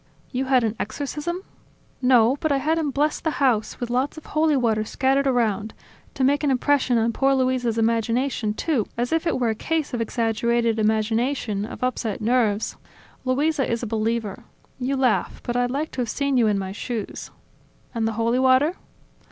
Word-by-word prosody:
"You 260 +1 -1
had 260 -2 +3
an 220 -1 0
exorcism?" 295 - -4 0.6
"No, 250 -1 +5
but 315 - 0
I 280 - +3
had 315 +4 +1
him 305 -3 0
bless 295 +2 0
the 320 - -1
house, 245 -6 +1
with 240 -1 -4
lots 260 +5 0
of 315 - -10
holy 310 -1 +2
water 225 -4 +1
scattered 270 +5 +1
around... 220 -4 0 0.4
to 265 - -1
make 285 +3 +2
an 290 - +2
impression 260 -1 +2
on 230 +1 +1
poor 270 +3 +2
Luisa's 255 -3 0
imagination, 230 0 0
too, 260 -5 0
as 245 +5 -1
if 325 +1 0
it 330 - 0
were 240 -2 +1
a - - +1
case 310 +5 -2
of 240 - -1
exaggerated 230 0 0
imagination, 220 0 0
of 230 - -8
upset 240 -4 -1
nerves... 225 -2 +1 0.5
Luisa 275 +1 +1
is 235 +1 -1
a - - 0
believer. 225 0 -2 0.4
You 265 +2 -1
laugh, 255 -4 +1
but 240 - -3
I'd 245 0 +1
like 290 +5 -2
to 255 - -3
have 235 - -2
seen 280 -1 0
you 235 -3 +4
in 210 -1 +2
my 190 -1 -3
shoes." 215 +1 -5 0.6
"And 225 -2 0
the 225 - -1
holy 230 +3 +1
water?" 260 +7 +3
245 Hz, 185 wpm, -23 LUFS, 225-275 Hz, 0.6 s, No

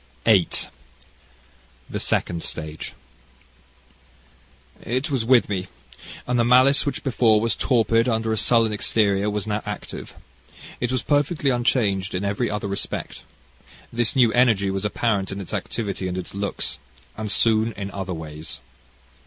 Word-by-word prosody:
CHAPTER - - +6
VIII 95 -5 +3 1.2
The - - -3
Second 85 -1 0
Stage 80 -1 -5 1.9
"It 130 +5 -2
was 130 -5 0
with 120 +1 +4
me, 95 -2 -3 0.6
and 125 0 0
the - - +4
malice 130 +4 +5
which 140 - -2
before 115 -5 +3
was 115 0 +1
torpid 115 +1 +2
under 115 -1 0
a - - +1
sullen 115 -1 +3
exterior, 105 -1 +1
was 105 0 -2
now 105 0 -2
active. 105 0 -7 0.6
It 120 0 -1
was 130 -2 -1
perfectly 145 0 +1
unchanged 110 -7 +1
in 95 +2 -2
every 100 +4 -1
other 105 -1 -3
respect. 100 0 -4 0.7
This 120 -1 +1
new 120 -4 +4
energy 110 -6 +3
was 95 +1 -3
apparent 105 -2 0
in 95 - -5
its 95 - -7
activity 100 -4 -3
and 90 0 -3
its 90 - -6
looks, 100 -6 -2 0.4
and 110 -1 -3
soon 110 +1 +3
in 100 -1 -6
other 95 -2 -4
ways. 80 0 -7
110 Hz, 145 wpm, -23 LUFS, 100-120 Hz, 1.9 s, CHAPTER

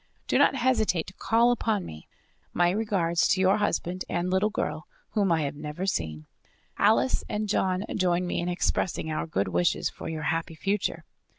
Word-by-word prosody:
Do - - +2
not - - +5
hesitate 235 -10 +1
to 185 - -11
call 235 +4 +3
upon 220 -5 0
me. 80 0 -10 0.5
My 175 0 +3
regards 190 -5 +1
to 195 - +2
your 190 +2 +4
husband 185 -3 -1
and 175 +1 -1
little 190 +3 +2
girl - - -3 0.2
whom 200 -4 +1
I 160 -2 +2
have 140 0 -2
never 150 +5 -5
seen; 80 - -2 0.5
Alice 125 +3 +3
and 210 0 -2
John 190 -2 +1
join 180 -1 +1
me 175 - -2
in 175 - -2
expressing 175 -2 -1
our 155 - -2
good 100 -11 -1
wishes 90 -1 +1
for - - -7
your 155 -1 -4
happy 165 +1 -1
future. 195 +5 -1
180 Hz, 180 wpm, -27 LUFS, 160-205 Hz, 0.5 s, not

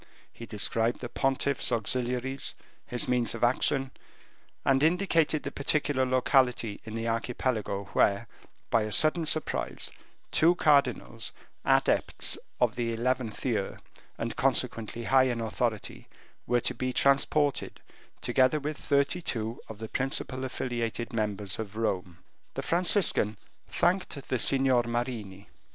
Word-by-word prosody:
He 115 - -10
described 115 +2 0
the 120 - -5
pontiff's 135 +1 +1
auxiliaries, 125 +3 -2 0.3
his 125 - -1
means 120 -3 +2
of 115 - -5
action, 130 +2 +2 0.7
and 135 0 +3
indicated 165 -2 +2
the 140 - -4
particular 140 -2 0
locality 125 -4 +2
in 110 0 -7
the 115 0 -3
Archipelago 115 -3 -2
where, 100 +3 +2 0.4
by 115 - +4
a 110 0 -3
sudden 155 +6 +4
surprise, 155 0 -1 0.4
two 170 +3 +4
cardinals, 140 - +1 0.3
adepts - - +2 0.2
of 120 -3 +1
the 120 -1 -1
eleventh 120 -1 -2
year, 110 -6 -1 0.4
and, 115 0 -3
consequently, 120 -3 0
high 130 +2 +4
in 120 -2 -1
authority, 115 -1 -3 0.4
were 120 0 +2
to - - 0
be 130 0 -2
transported, 140 +2 +2 0.4
together 130 +4 +3
with 150 +1 -4
thirty 140 +4 +1
two 115 -6 -3
of 110 - -8
the 110 +1 -6
principal 130 +1 -2
affiliated 120 -2 -3
members 105 -2 -2
of 110 -1 -6
Rome. 95 -6 -2 0.4
The - - -3
Franciscan 175 - +3 0.3
thanked 185 +1 0
the 130 - 0
Signor 130 -1 +3
Marini. 120 -5 -4
125 Hz, 130 wpm, -28 LUFS, 115-135 Hz, 0.7 s, by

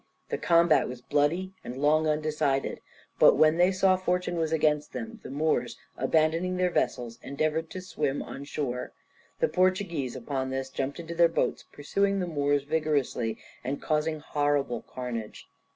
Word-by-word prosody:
The - - -2
combat 170 -2 +4
was 125 -1 -7
bloody 150 +8 0
and 125 - -6
long 155 +3 +3
undecided, 150 -3 0 0.4
but - - +7
when 155 +1 +4
they 180 +2 +5
saw 185 0 +4
fortune 180 -1 -1
was 160 -2 -1
against 150 -2 +1
them 230 0 -6
the - - -9
Moors, 135 -5 0 0.2
abandoning 160 +6 +1
their 180 -1 +2
vessels, 120 -7 -1
endeavoured 155 +3 -1
to 185 - -6
swim 150 -6 -2
on 140 - -8
shore. 130 -4 -3 0.5
The 485 - +4
Portuguese 185 - 0
upon 130 +1 -3
this 135 0 -3
jumped 140 +4 -3
into 170 0 -6
their 170 0 +5
boats, - - -1
pursuing 200 +7 0
the 180 - 0
Moors 145 -3 +1
vigorously, 145 -7 0 0.3
and 135 +3 -3
causing 155 0 0
horrible 145 -6 0
carnage. 120 -4 -6
155 Hz, 155 wpm, -28 LUFS, 135-170 Hz, 0.5 s, but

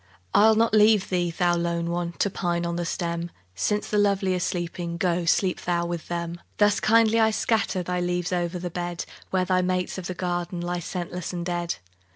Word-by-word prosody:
I'll 220 +1 +6
not 225 0 +2
leave 215 -2 +5
thee, 175 -2 +1
thou 175 +1 +1
lone 170 0 -1
one! 170 0 -2
To 200 - 0
pine 175 -2 -1
on 170 0 -2
the 170 0 -2
stem; 170 0 -2 0.2
Since 205 - -1
the 210 - +1
lovely 195 -2 +2
are 180 - 0
sleeping, 170 -1 -3
Go 175 -1 0
sleep 180 +2 +2
thou 170 -1 0
with 170 -1 -4
them. 170 0 -4 0.2
Thus 205 -1 +4
kindly 225 0 +4
I 220 0 +5
scatter 215 -4 0
Thy 180 +1 -2
leaves 180 0 -1
o'er 175 -1 +1
the 175 0 -5
bed, 175 0 -4 0.2
Where 185 -1 +1
thy 185 0 +2
mates 185 +1 -1
of 175 - -5
the 185 - -4
garden 175 0 -2
Lie 175 0 -2
scentless 180 +1 -5
and 175 -1 -3
dead. 175 -1 -2
175 Hz, 200 wpm, -25 LUFS, 170-190 Hz, 0.2 s, I'll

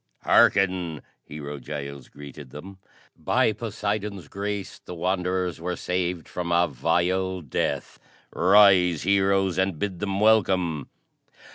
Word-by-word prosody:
"Harken," 90 -5 +3 0.2
Hero 75 -1 -7
Giles 70 0 -7
greeted 70 -1 -11
them. 95 +8 -11 0.4
"By 110 - +1
Poseidon's 105 -4 -4
grace 100 0 -5
the 90 - -9
Wanderers 90 -1 -1
were 90 +1 -2
saved 90 -2 -2
from 90 -1 -4
a 85 0 +3
vile 90 +6 0
death. 70 -6 -3 0.3
Rise 95 -4 +5
Heroes, 95 -1 +2
and 95 -3 0
bid 95 0 -3
them 100 -1 -2
welcome!" 95 -8 +2
90 Hz, 115 wpm, -25 LUFS, 80-100 Hz, 0.4 s, Rise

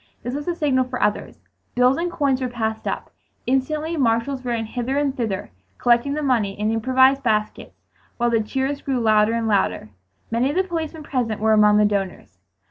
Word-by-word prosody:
This 245 - -4
was 290 +3 -5
the 350 - -1
signal 270 -5 +1
for 250 0 -5
others. 210 - -2 0.3
Bills 250 +2 +4
and 345 +1 -2
coins 280 -6 0
were 255 - 0
passed 220 -2 -3
up. - - -4 0.3
Instantly 300 +5 -1
marshals 255 +1 0
ran 235 -2 -2
hither 245 +4 -3
and 285 -2 0
thither 215 -6 -3 0.3
collecting 245 +4 +2
the 305 - -2
money 220 -8 0
in 215 +1 0
improvised 260 +4 +3
baskets 215 -3 -2 0.3
while 240 0 +1
the 230 -1 +2
cheers 265 +6 -2
grew 265 -3 -1
louder 215 -1 +3
and 230 -1 -1
louder. 105 - 0 0.4
Many 235 +4 +1
of 290 - -3
the 375 - +3
policemen 325 -3 -5
present 240 -7 -2
were 220 +1 +3
among 210 -1 +5
the 210 - +4
donors. 195 - -3
245 Hz, 190 wpm, -22 LUFS, 220-275 Hz, 0.4 s, among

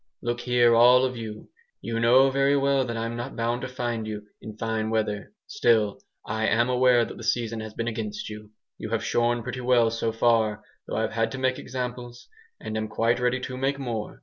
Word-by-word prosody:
"Look 120 0 -1
here, 120 -1 +3
all 125 +2 +6
of 130 -1 -3
you! 110 -2 -8 0.3
You 115 0 -3
know 130 +4 +5
very 140 +1 +3
well 140 -1 +2
that 115 -2 -4
I'm 115 +1 -3
not 120 +3 -6
bound 120 +1 -1
to 130 - -3
find 120 -3 -3
you 105 -1 -5 0.2
in 110 -1 -9
fine 110 -1 -2
weather. 105 -2 -2
Still 115 - +2 0.3
I 110 +1 -1
am 120 +3 +2
aware 125 -1 +4
that - - -9
the - - -9
season 115 -2 -1
has 110 -1 -7
been 115 - -3
against 110 -2 -4
you. 105 0 -9 0.3
You 110 - -5
have 115 0 -1
shorn 120 0 +1
pretty 125 +1 -5
well, 120 -2 +3
so 115 0 -1
far, 110 -2 +2 0.2
though - - -4
I've 110 0 -1
had 115 0 0
to - - -4
make 130 0 0
examples, 125 -1 -6 0.3
and 110 - -6
am 110 0 -2
quite 115 +2 +1
ready 125 +1 +1
to 130 - -5
make 135 +2 0
more. 120 -6 -5
115 Hz, 210 wpm, -26 LUFS, 110-125 Hz, 0.3 s, all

